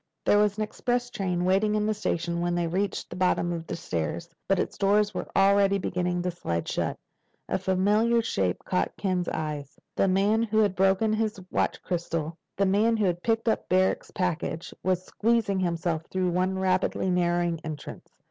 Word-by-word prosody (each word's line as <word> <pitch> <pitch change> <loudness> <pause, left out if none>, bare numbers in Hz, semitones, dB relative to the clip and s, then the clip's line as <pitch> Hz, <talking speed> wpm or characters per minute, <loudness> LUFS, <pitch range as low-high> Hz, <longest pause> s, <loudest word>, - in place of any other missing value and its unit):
There 205 - +5
was 210 0 +2
an 215 - 0
express 245 +3 -2
train 180 -2 -1
waiting 200 +3 +2
in 210 0 +1
the 215 - +1
station 170 -4 -2
when 175 0 0
they 175 -1 0
reached 190 +5 -2
the - - -5
bottom 180 -1 +1
of 165 -1 -5
the - - -3
stairs, 85 - -3 0.2
but 195 - +3
its - - -2
doors 205 +1 +2
were - - -4
already 200 0 +4
beginning 180 -1 -1
to 180 - -1
slide 85 - -3
shut. - - -1 0.5
A - - -1
familiar 205 +5 +2
shape 95 - -1
caught 185 - -1
Ken's 185 -3 -1
eye. 150 -2 -3 0.3
The - - +2
man 200 +4 +3
who 220 -1 0
had 210 -3 +4
broken 195 +4 +3
his 215 -2 -1
watch - - 0
crystal—the 170 +2 -3
man 215 +4 +3
who 215 - +1
had 175 -1 0
picked 225 +2 0
up 225 - 0
Barrack's 185 +1 +2
package—was 180 +1 -2
squeezing 220 -3 +1
himself 170 -2 -1
through 185 -1 0
one 185 +2 0
rapidly 185 0 +1
narrowing 175 -1 +1
entrance. 155 -2 -7
185 Hz, 175 wpm, -27 LUFS, 175-205 Hz, 0.5 s, There